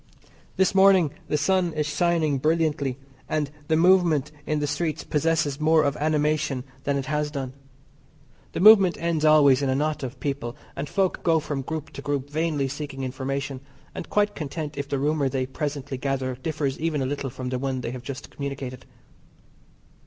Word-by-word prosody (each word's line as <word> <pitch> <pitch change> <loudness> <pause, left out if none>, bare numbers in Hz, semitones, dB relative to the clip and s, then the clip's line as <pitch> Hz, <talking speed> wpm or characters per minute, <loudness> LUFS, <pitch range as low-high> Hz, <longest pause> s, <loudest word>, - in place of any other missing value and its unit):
This 190 +1 +3
morning 190 -5 +5 0.2
the 150 - +1
sun 175 +2 +1
is 155 -1 -1
shining 155 -2 +1
brilliantly, 150 -3 +1 0.3
and 150 -2 -1 0.2
the 160 - +2
movement 170 -4 +4 0.2
in 155 - +1
the 150 - 0
streets 155 +2 -2
possesses 150 -2 0
more 155 0 +4
of 140 0 +1
animation 150 -3 0 0.2
than 140 0 +1
it 135 - -3
has 150 +1 -1
done. 135 -3 -5 1.0
The - - -2
movement 200 -3 +7
ends 165 -2 0
always 145 -3 +6
in 140 - 0
a 130 - +2
knot 150 +2 -1
of 130 -1 -6
people, 135 -4 -3 0.2
and 140 +1 -4
folk 195 -2 0
go 165 -1 +3
from 145 -2 -3
group 155 +2 -5
to - - -8
group 145 -1 -3
vainly 155 -3 0
seeking 145 -1 -5
information, 135 +1 -3 0.3
and - - -7
quite 205 0 +2
content 150 0 -5
if 140 0 -4
the 140 - 0
rumour 145 0 +1
they 130 0 -1
presently 140 0 -4
gather 135 -1 -1
differs 140 +1 -3
even 155 -3 0
a - - -1
little 140 0 -3
from 130 0 -5
the 130 0 -2
one 130 -1 -2
they 115 - -4
have 125 -1 -6
just 140 +2 -7
communicated. 135 -3 -6
145 Hz, 180 wpm, -25 LUFS, 135-160 Hz, 1.0 s, movement